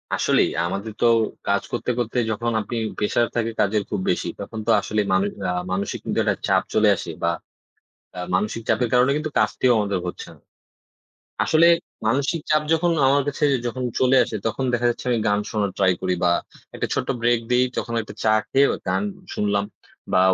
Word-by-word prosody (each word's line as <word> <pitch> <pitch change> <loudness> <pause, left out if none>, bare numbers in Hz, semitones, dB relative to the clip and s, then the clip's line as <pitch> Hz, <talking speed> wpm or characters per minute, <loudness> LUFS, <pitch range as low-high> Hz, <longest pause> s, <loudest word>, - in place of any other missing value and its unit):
আসলেই - - +2 0.2
আমাদের 100 +5 -4
তো, - - +4 0.4
কাজ 100 0 +2
করতে, 120 - -3
করতে, 120 +1 -2
যখন 115 +2 -1
আপনি 120 - -6 0.2
প্রেশার 115 +3 +1
থাকে 115 -1 0
কাজের 105 +1 +2
খুব 105 - -2
বেশি। - - -2
তখন 110 - -6
তো 115 - +4
আসলেই 105 -1 -1
মানু 95 +1 +3 0.2
আ - - +1 0.2
মানসিক 100 +2 -2
কিন্তু - - -1
একটা - - +1
চাপ - - +3
চলে 105 -1 +4
আসে 85 -1 -6
বা 85 - +3 0.9
আ - - -4
মানসিক 105 +4 -1
চাপের 125 - +2
কারণে 125 +2 +4
কিন্তু 155 0 -3
কাজটিও 125 - +2
আমাদের 100 -2 0
হচ্ছে 90 - -6
না। - - -22 1.0
আসলে 160 +1 +4 0.4
মানসিক 140 +7 +1
চাপ 155 0 +4
যখন 170 +1 +2
আমার 140 +1 +4
কাছে 145 - -1 0.2
যখন 125 +2 -3 0.2
চলে 130 +1 +4
আসে, 110 - -5
তখন 120 +4 -1
দেখা 120 0 +1
যাচ্ছে - - -6
আমি 120 - +2
গান 105 0 +2
শোনার 105 -2 0
ট্রাই 95 -2 +4
করি 90 -1 +1
বা 85 - +4 0.4
একটা - - -2
ছোট্ট - - -2
ব্রেক 120 0 +3
দেই। 125 +1 +4
তখন 115 - -3
একটা 110 - -10
চা 110 - +3 0.2
খেয়ে 140 +1 +5 0.2
গান - - +1 0.3
শুনলাম 100 -1 0 0.5
বা - - +4
115 Hz, 185 wpm, -23 LUFS, 100-125 Hz, 1.0 s, খেয়ে